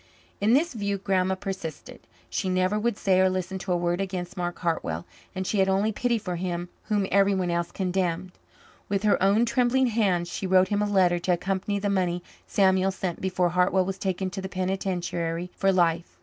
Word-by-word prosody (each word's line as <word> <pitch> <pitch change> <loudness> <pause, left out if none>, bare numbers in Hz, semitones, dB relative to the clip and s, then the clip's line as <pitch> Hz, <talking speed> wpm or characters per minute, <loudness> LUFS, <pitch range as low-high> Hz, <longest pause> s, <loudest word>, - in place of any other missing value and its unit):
In 210 +3 +3
this 305 +4 +3
view 200 -3 -2
Grandma 190 -1 +1
persisted. 190 -4 -6 0.3
She 190 - -2
never 185 +3 +1
would 230 -1 0
say 190 -1 +2
or 190 0 +5
listen 185 0 -3
to 185 - -4
a 175 - +3
word 175 +1 0
against 185 -2 -4
Mark 175 -2 -3
Hartwell, 90 - -2 0.3
and 190 0 -3
she 205 - 0
had 190 0 +3
only 200 +3 +2
pity 235 +2 0
for 180 -5 -4
him 175 0 -3 0.2
whom 205 -2 +1
everyone 195 -2 +3
else 170 0 -1
condemned. 180 -1 -1 0.6
With 200 0 0
her 210 - +3
own 200 +5 +4
trembling 250 +2 +2
hands 185 -6 +1
she 190 +2 -4
wrote 185 0 +4
him 205 0 +1
a 210 - +1
letter 180 -3 +3
to 180 +1 +1
accompany 195 +3 -1
the 200 +1 -2
money 180 -3 0 0.2
Samuel 190 -1 +3
sent 185 -2 -4
before 185 -1 +1
Hartwell 180 +2 +2
was 195 0 -4
taken 190 -1 -2
to 190 - -5
the 190 - -5
penitentiary 180 -2 -2
for 195 0 +2
life. 170 -2 +1
190 Hz, 195 wpm, -26 LUFS, 180-200 Hz, 0.6 s, or